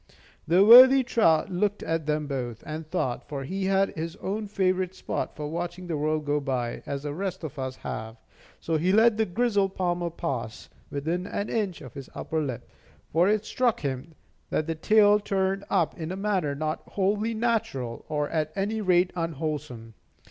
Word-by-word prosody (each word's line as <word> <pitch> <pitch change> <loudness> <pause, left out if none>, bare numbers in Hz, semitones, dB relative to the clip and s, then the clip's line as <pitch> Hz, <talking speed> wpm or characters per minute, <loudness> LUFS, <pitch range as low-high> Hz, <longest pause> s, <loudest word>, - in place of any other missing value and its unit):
The 180 +4 +5
worthy 260 +4 +10
trout 205 -8 +2
looked 205 +3 0
at 165 -2 -2
them 150 0 0
both, 125 -5 -4
and 155 0 -6
thought; 130 -9 -2
for 140 -2 -4
he 190 +7 -3
had 195 0 +2
his 165 +2 -5
own 210 +2 -4
favorite 185 -2 0
spot - - -4
for 150 -1 -4
watching 175 +3 -4
the 170 -2 -3
world 155 +1 -1
go 145 0 +1
by, 130 -4 -2
as 140 0 -4
the 145 -1 -3
rest 190 +1 -4
of 150 -2 -6
us 130 -1 -3
have. 110 -1 -6 0.4
So 165 -1 -1
he 175 +4 +1
let 220 +2 +5
the 220 - +1
grizzled 200 -1 +1
palmer 175 -1 -1
pass, 135 -9 -5 0.2
within 165 +6 -2
an 205 - -3
inch 205 -6 -2
of 130 -5 -10
his 140 -2 -9
upper 160 -1 -2
lip; 130 -6 -4 0.5
for 170 +5 +4
it 215 0 +1
struck 245 -1 0
him 140 +3 -4 0.3
that 155 - 0
the 165 - -1
tail 210 +5 +4
turned 195 -1 -1
up 175 -5 +1
in 160 +1 -4
a - - -3
manner 190 -8 -1
not 155 +2 -2
wholly 210 +3 0
natural, 220 - -1
or 150 -1 0
at 155 -1 -1
any 210 +3 -1
rate 180 -2 +3
unwholesome. 150 -8 -4
170 Hz, 185 wpm, -26 LUFS, 150-200 Hz, 0.5 s, worthy